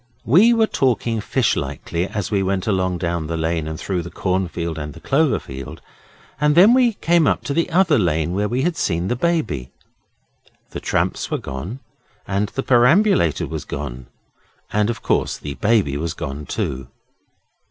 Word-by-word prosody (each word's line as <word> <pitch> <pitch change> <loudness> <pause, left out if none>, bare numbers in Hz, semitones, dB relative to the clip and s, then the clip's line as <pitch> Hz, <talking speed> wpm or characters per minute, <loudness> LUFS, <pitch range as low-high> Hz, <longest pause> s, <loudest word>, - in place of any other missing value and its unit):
We 185 - +6
were 225 -1 +4
talking 120 - 0
fishlikely 100 -7 -1
as 105 -1 -4
we 100 -2 +2
went 95 -1 -1
along 95 -3 0
down 85 -2 -2
the 85 +1 -3
lane 80 -1 -1
and 80 +1 -5
through 90 -1 -2
the 85 - -7
cornfield 85 -4 -2
and 75 -1 -6
the - - -10
cloverfield, 85 - -1 0.6
and 150 0 +3
then 195 +7 +7
we 250 -3 +4
came 170 -4 +2
to 140 - 0
the 165 +4 0
other 170 -5 +3
lane 85 -3 0
where 105 +2 0
we 125 +2 0
had 175 +1 0
seen 85 - -1
the - - +1
Baby. 125 - -1 1.0
The - - -5
tramps - - -1
were - - -1
gone, 85 - -6 0.5
and 100 +1 0
the 135 - -4
perambulator 125 - +3
was - - -5
gone, 65 -4 -6 0.7
and, 105 +1 +2
of 115 -1 -4
course, - - 0
the 70 - -6
Baby 100 -8 +1
was 80 +1 -3
gone 70 +1 -6
too. 65 -1 -3
100 Hz, 165 wpm, -21 LUFS, 80-135 Hz, 1.0 s, then